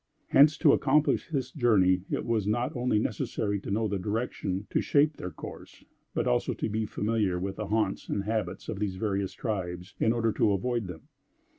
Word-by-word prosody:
Hence, 150 +2 +6
to - - +5
accomplish 150 0 +2
this 135 -5 -2
journey, 95 - +3
it - - -2
was 110 -4 0
not 120 +4 0
only 125 -3 +1
necessary 105 -1 -1
to 95 - -8
know 110 +2 +1
the 100 -1 -2
direction 105 -2 -2
to - - +2
shape 145 +1 +3
their 90 - -5
course, - - -10 0.3
but - - +1
also - - +1
to - - -2
be 110 0 -1
familiar 105 -4 0
with 95 +2 -4
the 105 -1 -4
haunts 105 -2 -1
and 100 - -1
habits 105 -4 -3
of 100 - -4
these 100 -3 -1
various 100 -1 -1
tribes, 90 -4 -4
in 110 - +3
order 115 -1 +1
to 105 - +2
avoid 115 +2 -1
them. 85 -3 -8
105 Hz, 190 wpm, -28 LUFS, 95-115 Hz, 0.3 s, Hence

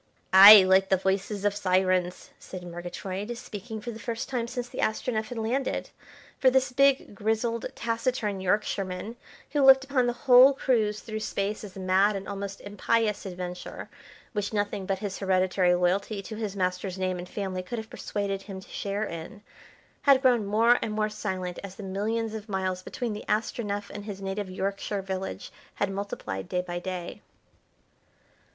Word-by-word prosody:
"Ay, 200 +1 +12
like 190 +1 +4
the 190 - +4
voices 195 +2 -1
of 205 - +3
syrens," 185 -2 0
said 185 -1 -9
Murgatroyd, 185 +5 -5
speaking 215 0 -7
for 235 +3 -6
the 225 - -9
first 235 +2 -4
time 240 -3 -2
since 245 0 -4
the - - -9
Astronef 220 0 0
had 245 - -7
landed; 245 +5 -2 0.5
for 265 - +6
this 260 0 +2
big, 275 -2 +3
grizzled, 225 +3 -1
taciturn 230 -4 -1
Yorkshireman, 190 +2 -1 0.4
who 295 - +1
looked 265 0 +7
upon 265 -3 +1
the 240 - +1
whole 255 +1 +8
cruise 220 -6 +1
through 215 -1 -5
Space 210 -1 -3
as 195 -2 -9
a - - -6
mad 190 +3 +3
and 195 0 -5
almost 200 -1 -5
impious 210 +1 0
adventure, 180 -1 -7 0.4
which 205 -2 -2
nothing 205 -2 -2
but 195 - 0
his 195 0 -5
hereditary 185 -1 +2
loyalty 195 +3 0
to 220 - -7
his 210 -2 -4
master's 185 0 -2
name 185 -1 -1
and 180 +1 -8
family 190 -3 -3
could 185 +6 -6
have 220 0 -7
persuaded 200 -1 -3
him 195 -1 -8
to 190 - -15
share 205 +1 -3
in, 180 +5 -8 0.6
had 275 -1 +5
grown 240 -5 +3
more 230 +4 +4
and 215 - -2
more 215 0 0
silent 185 -4 -4
as 195 -1 -8
the 210 - -9
millions 215 +4 -2
of 220 0 -7
miles 185 -2 -2
between 235 +4 -4
the 210 - -6
Astronef 210 -1 -2
and 205 0 -7
his 205 -2 -6
native 195 0 -4
Yorkshire 195 +1 -3
village 190 0 -5 0.2
had 200 -1 -1
multiplied 195 - -5
day 180 0 -1
by 175 -1 -4
day. 180 -1 -6
205 Hz, 170 wpm, -27 LUFS, 190-225 Hz, 0.6 s, Ay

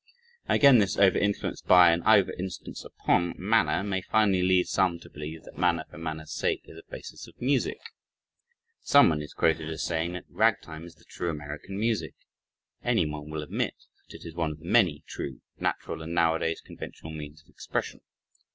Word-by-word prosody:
Again, 140 -4 +7
this 100 -2 +1
over 100 -2 +5
influence 100 0 -1
by 90 -2 +7
and 85 +1 +1
over 105 -3 +5
insistence 95 -1 -7
upon 85 -1 0
"manner" 105 +1 +2
may 95 -2 -1
finally 100 -2 +2
lead 90 0 +3
some 95 -3 +1
to - - -15
believe 75 +2 -7
"that - - -13
manner 85 -3 +2
for 75 - -11
manner's 80 -1 -5
sake - - -1
is - - -13
a - - -18
basis - - -9
of - - -18
music." 130 +1 +1 1.0
Someone 85 - +5
is 75 - -9
quoted 80 -1 +1
as 80 -1 -4
saying 85 +1 -1
that 90 - -7
"ragtime 85 -5 0
is 85 -1 -13
the - - -24
true 85 - -4
American 75 +5 -6
music." 115 0 -1 0.7
Anyone 75 0 0
will 75 0 -4
admit - - -2 0.3
that - - -11
it - - -12
is 80 - -8
one 80 -1 -1
of 75 - -7
the 80 - -16
many 90 -7 +3
true, 65 -3 -6 0.2
natural, - - -2
and, 80 +2 -5
nowadays, 80 -1 +1
conventional 80 - -9
means 75 0 -9
of - - -30
expression. - - -4
85 Hz, 180 wpm, -27 LUFS, 80-95 Hz, 1.0 s, Again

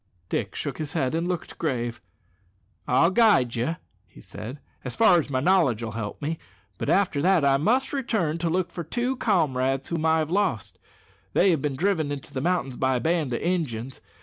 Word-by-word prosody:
Dick - - -2
shook - - -4
his 155 0 -4
head 135 -6 0
and 165 +2 0
looked 180 -2 -4
grave. 120 -7 -2 0.9
"I'll 165 +8 +4
guide 195 - +4
you," 120 +8 -1 0.4
said 120 +5 -8
he, 150 - -20 0.2
"as 125 - -5
far 215 -6 +6
as 150 - -4
my 130 -2 0
knowledge 145 - +3
'll 110 - -4
help 110 -2 -5
me; 160 +2 -2 0.4
but - - -2
after 185 -7 +2
that 180 -3 +3
I 135 -1 +4
must 240 - +1
return 210 - -1
to 170 0 0
look 180 +2 0
for 170 - -5
two 245 - -1
comrades 135 - +1
whom 165 -2 -2
I 160 0 +4
have 155 0 -1
lost. 185 - -1 0.5
They 195 - +4
have 160 -5 +1
been 145 -2 -1
driven 160 -3 0
into 140 -2 -7
the 130 - -2
mountains 165 -6 -1
by 130 0 +1
a - - +1
band 160 -2 0
of - - -2
Injuns. 135 -9 -2
160 Hz, 200 wpm, -25 LUFS, 130-180 Hz, 0.9 s, far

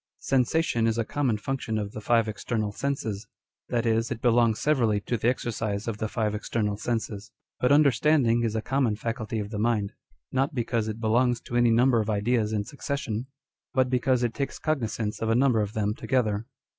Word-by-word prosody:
Sensation 130 -2 +1
is 115 0 0
a 115 - 0
common 130 -5 0
function 115 -1 -3
of 105 -1 -3
the 110 - -7
five 115 0 +2
external 105 +1 -2
senses, 110 -4 -3 0.4
that 120 -1 0
is, 115 0 +1
it 120 - -4
belongs 115 -2 +3
severally 120 -9 +2
to 120 - -2
the 115 +1 0
exercise 110 -4 -2
of 110 -2 -3
the 110 - -1
five 110 -2 -1
external 105 -1 -1
senses: 105 -2 -3 0.3
but 125 - +2
understanding 140 -4 +4
is 115 -1 -1
a 110 - -1
common 130 -5 +1
faculty 115 0 -4
of 105 -1 -4
the 105 - -3
mind 105 -3 +1
â€" - - -35 0.4
not 135 +3 0
because 115 -2 -1
it 110 +1 -4
belongs 120 +2 +2
to 120 - -7
any 120 -1 +4
number 120 +1 +4
of 105 - -3
ideas 110 +1 +1
in 105 -2 0
succession, 130 -1 -4 0.5
but 130 -1 +2
because 125 0 +2
it 120 -1 0
takes 140 +1 -3
cognisance 115 -8 -2
of 115 - 0
a 115 - +3
number 125 -3 +3
of 105 0 -3
them 105 -1 0
together. 110 -3 -1
115 Hz, 195 wpm, -27 LUFS, 110-125 Hz, 0.5 s, understanding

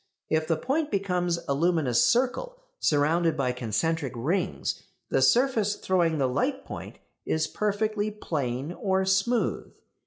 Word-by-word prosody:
If 155 0 +1
the 165 -1 +1
point 290 - -1
becomes 180 - 0
a 140 - +1
luminous 150 -5 +2
circle 265 - +1 0.2
surrounded 155 +2 +2
by 130 -3 +1
concentric 130 +5 -1
rings, 170 +10 -1 0.3
the - - +2
surface 220 - +3
throwing 175 -5 +1
the 135 - +2
light 260 - -1
point - - -8 0.3
is 160 0 0
perfectly 210 +1 -1
plane 145 - -3
or 190 0 0
smooth. 195 +6 +1
175 Hz, 130 wpm, -27 LUFS, 150-210 Hz, 0.3 s, surface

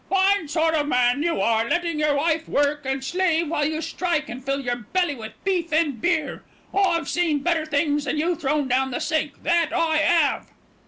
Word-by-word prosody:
Fine 385 -2 +2
sort 320 +1 +1
of 295 -2 0
man 250 0 +2
you 335 -5 0
are, 225 +2 +1
letting 340 -2 -1
your 300 -1 +2
wife 320 +2 0
work 290 -1 0
and 270 0 -2
slave 335 +1 0
while 295 -2 0
you 315 +2 -2
strike 330 -1 -2
and 245 +2 -7
fill 275 +1 -1
your 245 -2 -2
belly 340 - -1
with 220 -4 -9
beef 360 -4 -1
and 300 -7 +1
beer. 325 -5 -1 0.3
I've 380 -4 +1
seen 325 -5 0
better 325 -2 0
things 295 -1 0
than 285 - -2
you 340 +3 +1
thrown 295 -2 -1
down 265 +1 +1
the 250 - -3
sink, 310 -3 -2
that 335 -2 +2
I 320 -3 +1
'ave." 330 -5 +2
310 Hz, 200 wpm, -23 LUFS, 280-335 Hz, 0.3 s, Fine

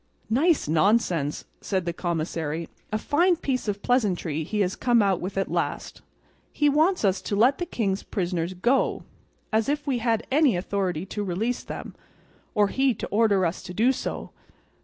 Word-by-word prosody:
"Nice 305 - +3
nonsense!" 165 -3 +1 0.2
said 190 -3 -1
the 170 - -2
commissary; 165 -2 -3 0.2
"a 215 - +1
fine 345 +10 +2
piece 265 -8 -2
of 205 -1 -3
pleasantry 185 - +1
he 210 +7 -1
has 185 -1 0
come 240 -1 +3
out 195 -4 +2
with 185 +2 -5
at 195 - -1
last! - - -3 0.5
He 295 -1 +2
wants 315 - +2
us 190 -1 +2
to 205 - -2
let 245 +7 +4
the 350 - -2
king's 200 - -1
prisoners 175 -1 -2
go, 240 +9 +1 0.5
as 220 +3 +2
if 290 0 -1
we 265 -4 0
had 230 -1 0
any 275 - +4
authority 185 -2 -2
to 205 +2 -4
release 205 +6 -1
them, - - -7 0.6
or 205 -1 +3
he 265 0 +2
to - - -5
order 205 -3 +3
us 170 +1 -2
to 180 - -9
do 235 +6 +4
so! - - -5
205 Hz, 175 wpm, -25 LUFS, 180-250 Hz, 0.6 s, let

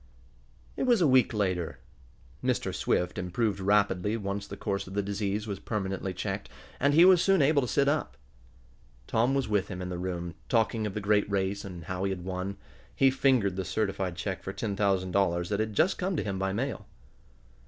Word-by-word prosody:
It - - 0
was 240 -3 +5
a 175 - +4
week 130 -2 +4
later. 95 -6 -1 0.7
Mr. - - 0
Swift 90 0 0
improved 95 +3 -1
rapidly 100 +1 +2
once 100 -1 -4
the 100 - -8
course 100 -1 -2
of 95 - -8
the 100 - +1
disease 100 +1 -2
was 100 -3 -4
permanently 95 -3 -3
checked, 85 - -4 0.3
and 140 +1 +3
he 170 +3 +8
was 185 -2 +7
soon 195 0 +4
able 145 0 +4
to 125 - -2
sit 140 +3 +2
up. 150 +2 0 0.9
Tom 120 +4 +1
was 135 - 0
with 105 -3 +1
him 90 -3 -6
in 90 0 -4
the 90 -1 -4
room, 90 -2 -4 0.2
talking 115 -2 +1
of 95 - -6
the 105 - -2
great 105 0 +2
race, 100 0 -1
and 90 -4 -8
how 90 +3 -4
he 100 - +1
had 90 -2 -4
won. 95 +1 -4 0.4
He 135 -1 +5
fingered 130 -8 +2
the 95 - -1
certified 95 -1 -2
check 95 +1 -4
for 95 - -5
ten 105 -1 -3
thousand 95 -2 +1
dollars 85 -3 +1
that 100 0 0
had 110 0 -1
just 185 - +2
come 185 +1 -1
to - - 0
him 100 -2 -3
by 95 0 0
mail. 125 +8 -3
100 Hz, 205 wpm, -29 LUFS, 95-115 Hz, 0.9 s, he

